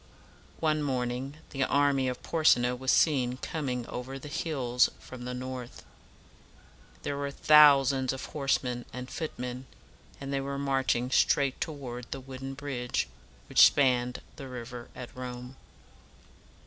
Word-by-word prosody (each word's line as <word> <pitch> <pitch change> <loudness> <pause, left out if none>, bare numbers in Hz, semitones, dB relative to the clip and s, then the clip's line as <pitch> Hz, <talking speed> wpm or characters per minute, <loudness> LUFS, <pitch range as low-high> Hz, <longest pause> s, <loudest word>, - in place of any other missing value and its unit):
One 155 -1 +1
morning 130 0 -2
the 135 -1 0
army 140 -1 +2
of 125 -1 -4
Por 165 -2 -2
se 140 - +7
na 120 +1 +1
was 130 +1 -4
seen 130 -5 +3
coming 130 -4 -3
over 125 +3 -6
the 145 +2 -9
hills 130 -6 +1
from 125 -1 -10
the 125 - -4
north. 125 -1 -7 1.2
There 140 - -2
were 140 0 -2
thousands 140 -3 +6
of 135 -1 -5
horsemen 130 -4 -1
and 125 0 -7
footmen, 125 -4 -5 0.5
and 140 0 -5
they 135 - 0
were 140 0 -4
marching 135 -3 0
straight 140 -1 +3
toward 125 -6 -5
the 135 - -4
wooden 135 +1 -7
bridge 125 - -2 0.4
which - - +8
spanned 125 - +1
the 135 - -7
river 120 -1 -8
at 125 -1 -9
Rome. 125 0 -7
130 Hz, 140 wpm, -29 LUFS, 125-140 Hz, 1.2 s, which